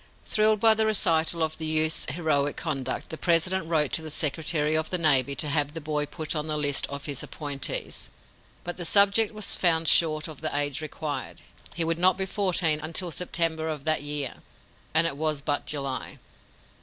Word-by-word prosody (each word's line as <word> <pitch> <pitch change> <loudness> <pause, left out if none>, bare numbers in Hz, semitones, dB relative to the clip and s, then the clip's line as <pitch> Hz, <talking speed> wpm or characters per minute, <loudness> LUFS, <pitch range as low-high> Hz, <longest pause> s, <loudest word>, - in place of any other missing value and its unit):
Thrilled 215 0 +2
by 225 +1 +7
the 220 0 +2
recital 165 -5 +2
of 155 0 -4
the 160 - -3
youth's 155 +1 +2
heroic 145 -2 -1
conduct, 140 -5 -3
the 160 - -7
President 170 +1 +1
wrote 155 -4 +1
to 160 - +1
the 160 - -7
secretary 155 0 0
of 155 0 -1
the 180 - 0
navy 140 -4 +3
to 150 - +1
have 145 0 +1
the 165 - -5
boy 150 -1 -3
put 155 +2 -4
on 150 0 -3
the 155 -1 -2
list 145 -2 0
of 140 0 -7
his 140 -3 -3
appointees. 145 -3 -3 0.5
But 175 - -6
the 175 - -4
subject 200 +4 +4
was 215 -2 +1
found 165 -2 +2
short 155 -1 +4
of 155 -3 -10
the 155 -2 -2
age 145 0 -1
required. 155 -1 -6 0.3
He 170 - 0
would 165 0 -1
not 185 0 +4
be 190 - -1
fourteen 180 -6 0
until 165 +3 -1
September 165 -1 -1
of 150 -3 -5
that 155 -2 +3
year, 145 -3 -5 0.5
and 160 +2 +4
it 140 -4 -3
was 155 -1 0
but 145 +1 -3
July. 140 -3 -4
160 Hz, 195 wpm, -26 LUFS, 150-170 Hz, 0.5 s, by